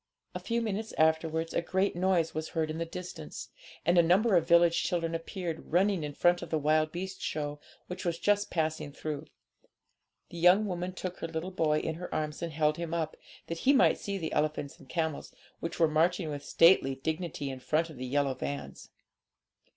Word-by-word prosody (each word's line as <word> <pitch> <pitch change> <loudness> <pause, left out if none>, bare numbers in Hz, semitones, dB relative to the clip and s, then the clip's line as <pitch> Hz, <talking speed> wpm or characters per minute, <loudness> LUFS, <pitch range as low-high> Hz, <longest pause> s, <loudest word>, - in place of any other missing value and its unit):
A - - -4
few 235 0 -1
minutes 220 0 -3
afterwards 160 +1 +2
a - - +1
great 190 +3 0
noise 175 -2 +1
was 155 +1 -3
heard 155 -1 +1
in 160 - -5
the 165 - -2
distance, 175 - -7 0.4
and 175 +1 +5
a - - +9
number 190 +6 +4
of 170 -2 +4
the - - -21
village 170 0 +5
children 165 -2 -1
appeared, 165 -1 -5
running 185 0 +3
in 145 -1 -5
front 175 0 +3
of 170 - -7
the 160 - +1
wild 155 +1 +2
beast 185 +2 -5
show, 145 -1 -3 0.3
which 180 +1 -6
was 170 -2 -1
just 205 +2 +1
passing 155 -3 -1
through. 150 +1 -5 1.0
The 170 - -7
young 180 +5 +6
woman 180 -1 -3
took 185 -1 -5
her - - -3
little 165 +3 -4
boy 155 -4 +2
in 160 - -2
her 180 - -6
arms, 155 0 -3
and 170 -1 -3
held 150 0 +1
him 170 -1 -3
up, 160 -2 -2 0.3
that 165 0 -5
he 275 - +4
might 270 - +4
see 200 -1 -3
the 160 -4 -4
elephants 150 -1 -1
and - - -17
camels, 160 -3 -3 0.2
which 165 +1 -5
were 165 - +5
marching 160 +2 +1
with 145 -1 -5
stately 165 -6 +5
dignity 155 -1 -3
in 130 - -7
front 160 +5 0
of 150 - -12
the 130 +1 -5
yellow 140 +1 +1
vans. 70 - -6
165 Hz, 205 wpm, -30 LUFS, 155-180 Hz, 1.0 s, a